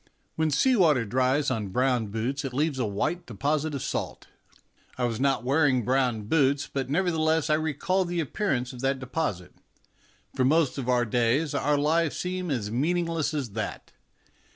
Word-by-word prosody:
When 160 0 +1
sea 250 - +3
water 150 - +3
dries 130 +5 +1
on 110 -5 -2
brown 125 +2 +1
boots 115 +7 -3
it 130 -2 -5
leaves 145 -1 0
a 120 - 0
white 155 - -2
deposit 145 +7 -1
of 135 - -4
salt; - - -4 0.7
I 125 - -2
was 115 -2 -1
not 135 -2 +1
wearing 130 -3 +2
brown 125 -4 +1
boots, 140 +3 +2
but, 135 -2 -4
nevertheless, 160 -2 +1
I - - +5
recalled 160 +4 0
the 175 0 -2
ap 155 - -4
pearance 130 - -1
of 125 - -9
that 135 0 +1
deposit. 130 - -3 0.8
For 130 - 0
most 145 0 +2
of 130 -1 -3
our 125 -1 +3
days 120 +6 +1
our 145 +1 +1
lives 155 +2 +1
seem 180 0 -3
as 115 -7 -2
meaningless 165 +3 0
as 135 -7 -3
that. 110 +1 -5
140 Hz, 175 wpm, -27 LUFS, 125-160 Hz, 0.8 s, I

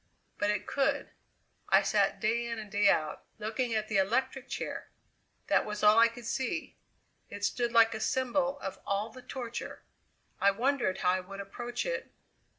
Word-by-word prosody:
But 205 - +2
it 210 -1 0
could! 275 -1 0 0.6
I - - +6
sat - - +2
day 235 +2 +1
in 230 -1 -3
and 215 -2 -8
day 205 0 +4
out, 155 -4 0
looking 225 +2 -2
at 215 0 0
the 215 - 0
electric 255 +7 +1
chair! - - -4 0.6
That - - +3
was 210 0 -5
all 210 +2 +7
I 230 - +8
could 230 +1 -10
see: 260 +2 -2 0.5
it 205 0 -3
stood 240 +2 0
like 230 -1 +6
a 220 - -4
symbol 265 +3 0
of 195 - -5
all 205 +3 -1
the 255 - -11
torture. 240 -2 -6 0.6
I 200 - +5
wondered 240 -1 +1
how 180 - +4
I 185 - +1
would 195 +2 -9
approach 240 - -4
it. - - -3
225 Hz, 175 wpm, -31 LUFS, 205-245 Hz, 0.6 s, I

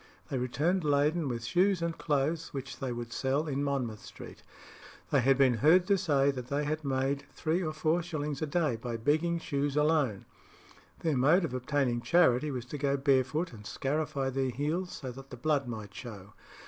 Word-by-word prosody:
They 135 - 0
returned 150 +9 0
laden 150 +2 +2
with 120 -2 -3
shoes 185 +9 +2
and 170 0 -2
clothes, 150 +1 -1
which 135 -2 -6
they 130 -2 -3
would 120 0 -5
sell 140 +4 0
in 140 -1 -1
Monmouth 125 -7 -2
Street. - - -11 0.7
They 140 - +4
had 135 +2 +4
been 130 -4 +4
heard 175 +5 +6
to 200 +1 +3
say 140 -6 +3
that 125 -3 -6
they 140 +3 -1
had 155 +1 -2
made 135 0 -1
three 165 +3 -1
or 155 -3 -1
four 155 +2 +1
shillings 150 -4 -4
a 155 - -1
day 150 -5 0
by 115 0 -4
begging 155 +8 +1
shoes 145 -3 -2
alone. 150 -9 +2 0.8
Their 160 -3 +1
mode 155 +8 +4
of 130 - -5
obtaining 130 -2 0
charity 150 -3 +3
was 125 -4 -4
to 145 - -3
go 140 0 +1
barefoot 140 +4 +1
and 105 -2 -11
scarify 140 +4 -2
their 135 0 0
heels 155 +9 -2
so 130 -3 -6
that 135 +2 -11
the 125 - -8
blood 140 0 0
might 110 -4 -6
show. 105 -4 -9
140 Hz, 190 wpm, -30 LUFS, 130-155 Hz, 0.8 s, heard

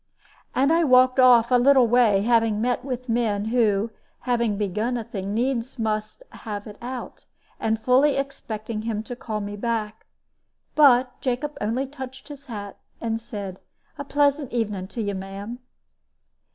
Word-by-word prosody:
And 275 +5 +3
I 335 +1 +3
walked 255 -2 +5
off 245 -2 +6
a 250 - +6
little 265 0 +6
way, 225 -4 +4
having 225 -2 +2
met 245 +3 0
with 255 -1 -5
men 225 -3 0
who, 220 -2 +2 0.3
having 235 -4 0
begun 215 +5 -1
a 235 - -3
thing, 200 -2 -5
needs 250 +1 -1
must 215 - -3
have 205 -3 -7
it 210 -1 -11
out, 250 +1 -7 0.3
and 220 0 0
fully 255 +5 +4
expecting 225 -5 -4
him 220 -1 -3
to 245 - -7
call 215 -3 -4
me 205 0 -5
back. 220 -1 -3 0.7
But 255 -4 +4
Jacob 275 +3 -2
only 230 +6 0
touched 265 0 -9
his 285 0 -11
hat, 205 -4 -7 0.2
and 225 -1 -2
said, 200 -4 -7 0.4
"A - - -2
pleasant 285 0 +1
evening 210 -5 -2
to 225 +3 -4
you, 205 -1 -2
ma'am." 195 +5 -6
235 Hz, 155 wpm, -24 LUFS, 215-255 Hz, 0.7 s, off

